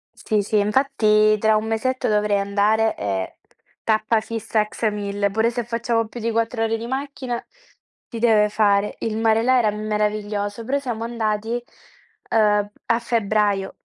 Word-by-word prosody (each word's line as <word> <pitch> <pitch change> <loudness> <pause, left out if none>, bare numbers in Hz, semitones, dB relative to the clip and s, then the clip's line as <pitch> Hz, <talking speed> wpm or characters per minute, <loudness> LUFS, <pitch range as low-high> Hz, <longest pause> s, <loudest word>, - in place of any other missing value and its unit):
Sì, 210 -3 -1
sì 210 +1 +1
infatti 215 -2 +3
tra 220 +1 +3
un 215 +1 0
mesetto 240 +4 -1
dovrei 210 -1 +2
andare 210 +2 +1
e 95 -2 -3 0.5
tappa 220 0 +2
fissa 225 -1 -2
a 210 - +1
Ksamil, 205 -2 -2
pure 220 +3 +2
se 240 0 -3
facciamo 230 0 -1
più 240 - -9
di 230 0 -1
4 230 0 0
ore 225 0 0
di 230 - -6
macchina 260 -1 -4 0.7
si 230 - -6
deve 220 -3 +4
fare. 205 -1 +2
Il 220 -1 -2
mare 225 0 +3
là 255 +2 +3
era 220 -4 +2
meraviglioso, 210 0 -2
però 275 +3 0
siamo 240 -5 -4
andati, 225 0 -2 0.7
ehm, 210 -2 +2 0.2
a 230 - +2
febbraio. 210 -4 0
220 Hz, 155 wpm, -22 LUFS, 210-230 Hz, 0.7 s, deve